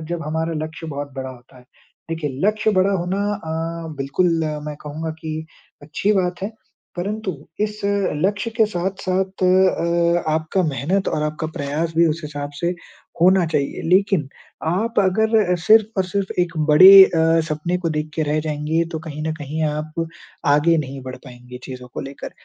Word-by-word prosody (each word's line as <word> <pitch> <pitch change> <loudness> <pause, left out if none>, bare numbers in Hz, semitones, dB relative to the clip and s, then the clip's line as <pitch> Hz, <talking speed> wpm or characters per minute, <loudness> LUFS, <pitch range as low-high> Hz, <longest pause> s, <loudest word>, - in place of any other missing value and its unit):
जब 170 -2 -3
हमारा 160 +2 -1
लक्ष्य 160 +1 -8
बहुत 145 -2 -5
बड़ा 130 0 -4
होता 125 0 -15
है। 125 - -18 0.5
देखिए 160 -3 -2 0.2
लक्ष्य 215 0 +2
बड़ा 195 +2 +2
होना 185 +1 -1 0.2
अ, 165 -2 -5
बिल्कुल 140 +7 +1 0.4
मैं 150 -1 -5
कहूँगा 155 +2 -5
की 155 0 -4 0.4
अच्छी 160 +8 0
बात 180 -2 -1
है। 205 +3 -3 0.4
परंतु 200 +2 -3 0.3
इस 210 0 -1
लक्ष्य 200 +2 0
के 225 - +5
साथ-साथ 190 0 -2
अ, 170 -2 +3
आपका 160 +4 0
मेहनत 160 +6 0
और 150 - -1
आपका 155 +1 -2
प्रयास 150 +4 -2
भी 170 0 +5
उस 160 +2 -1
हिसाब 145 -1 -5
से 175 +1 0 0.5
होना 185 0 +5
चाहिए। 150 -3 -1
लेकिन 185 -5 +3 0.4
आप 205 +8 0
अगर 210 0 +2
सिर्फ़ 215 +3 +5
और 190 - +3
सिर्फ़ 190 +1 -2
एक 175 -1 0 0.2
बड़े 185 +6 +9
अ, 165 -2 +2
सपने 155 +4 -1
को 175 -2 -2
देख 155 0 -3
के 160 - 0
रह 150 +1 +1
जाएँगे 155 +2 -1
तो 160 - -2
कहीं 155 0 -5
न 160 - 0
कहीं 155 +1 -4
आप 155 +2 -2 0.5
आगे 160 +3 +4
नहीं 135 -2 -4
बढ़ 130 0 -7
पाएँगे 125 0 -11
चीज़ों 125 -1 -8
को - - -3
लेकर। 135 +1 -7
165 Hz, 170 wpm, -21 LUFS, 150-185 Hz, 0.5 s, बड़े